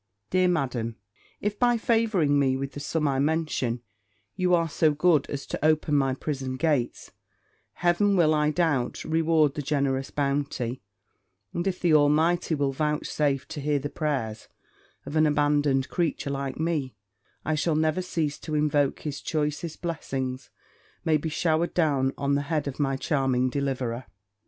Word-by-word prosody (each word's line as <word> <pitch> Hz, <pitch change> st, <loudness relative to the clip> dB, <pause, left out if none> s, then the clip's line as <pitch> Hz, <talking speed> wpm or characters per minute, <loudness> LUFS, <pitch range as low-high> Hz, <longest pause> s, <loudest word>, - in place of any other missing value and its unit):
Dear 185 Hz, 0 st, +3 dB
Madam, 130 Hz, -9 st, -1 dB, 0.5 s
if, 210 Hz, 0 st, -2 dB
by 240 Hz, -1 st, +4 dB
favouring 215 Hz, -11 st, +2 dB
me 130 Hz, -1 st, +2 dB
with 135 Hz, 0 st, -4 dB
the -, -, -7 dB
sum 150 Hz, +1 st, -1 dB
I 135 Hz, -1 st, 0 dB
mention, 140 Hz, -6 st, 0 dB, 0.5 s
you 180 Hz, -1 st, +3 dB
are 165 Hz, -1 st, +1 dB
so 155 Hz, -1 st, +2 dB
good 155 Hz, -1 st, +3 dB
as 140 Hz, -1 st, -4 dB
to -, -, -5 dB
open 155 Hz, -1 st, +2 dB
my 135 Hz, -2 st, +2 dB
prison 135 Hz, -2 st, -4 dB
gate, 145 Hz, -6 st, -1 dB, 0.6 s
Heaven 180 Hz, +4 st, +2 dB
will, 160 Hz, -3 st, +4 dB
I 150 Hz, 0 st, +2 dB
doubt 150 Hz, -6 st, 0 dB
not, -, -, -6 dB
reward 160 Hz, -3 st, +3 dB
the 150 Hz, -, -3 dB
generous 135 Hz, -2 st, 0 dB
bounty: 140 Hz, -3 st, -2 dB, 0.7 s
and, 175 Hz, +2 st, -2 dB
if 185 Hz, -2 st, -1 dB
the 170 Hz, -3 st, +2 dB
Almighty 160 Hz, +3 st, +3 dB
will 140 Hz, -2 st, 0 dB
vouchsafe 150 Hz, -1 st, -1 dB
to 150 Hz, -, -5 dB
hear 145 Hz, +1 st, +1 dB
the 145 Hz, +1 st, -4 dB
prayers 135 Hz, -9 st, -2 dB, 0.6 s
of 150 Hz, -, -6 dB
an 155 Hz, 0 st, +4 dB
abandoned 145 Hz, -2 st, +2 dB
creature 165 Hz, -5 st, -1 dB
like 140 Hz, 0 st, -4 dB
me, 155 Hz, -5 st, -1 dB, 0.5 s
I 155 Hz, -, +1 dB
shall 155 Hz, +1 st, +1 dB
never 155 Hz, +3 st, +1 dB
cease 160 Hz, -5 st, -2 dB
to 155 Hz, -, -4 dB
invoke 150 Hz, -2 st, +1 dB
his 145 Hz, -2 st, -5 dB
choicest 155 Hz, +2 st, -3 dB
blessings 135 Hz, -6 st, -3 dB, 0.6 s
may 155 Hz, -1 st, +4 dB
be 160 Hz, +2 st, -3 dB
showered 160 Hz, +2 st, 0 dB
down 140 Hz, -6 st, +2 dB
on 140 Hz, 0 st, 0 dB
the 140 Hz, -, +2 dB
head 155 Hz, -3 st, 0 dB
of 140 Hz, -, -5 dB
my 135 Hz, -2 st, +1 dB
charming 130 Hz, -3 st, +1 dB
deliverer. 130 Hz, -3 st, -2 dB
150 Hz, 160 wpm, -26 LUFS, 135-160 Hz, 0.7 s, by